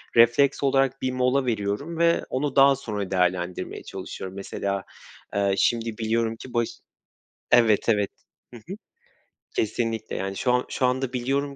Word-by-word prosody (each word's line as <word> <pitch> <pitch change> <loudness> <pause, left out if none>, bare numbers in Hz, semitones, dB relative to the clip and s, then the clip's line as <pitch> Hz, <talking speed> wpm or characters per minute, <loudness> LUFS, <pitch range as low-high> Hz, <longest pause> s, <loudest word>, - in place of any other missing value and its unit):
refleks 120 +5 +4
olarak 135 -1 +2
bir 130 - 0
mola 130 +1 +1
veriyorum 115 +8 -2
ve 170 0 +3
onu 135 +1 -2
daha 140 0 +7
sonra 105 -7 -5
değerlendirmeye 90 -1 -1
çalışıyorum. 95 0 -7
Mesela, 100 0 -3 0.5
eee, 100 -1 +2
şimdi 115 0 +1
biliyorum 115 0 0
ki 125 +2 -11
baş 120 -1 +1 0.8
Evet, 115 -2 +4
evet, 105 -3 +2 0.4
hı - - -8
hı. 170 - -8 0.8
Kesinlikle. 110 0 -1
Yani, 95 0 -3
şu 125 - +1
an 125 0 +2
şu 130 - 0
anda 130 0 0
biliyorum 140 +3 -1
120 Hz, 145 wpm, -25 LUFS, 105-135 Hz, 0.8 s, daha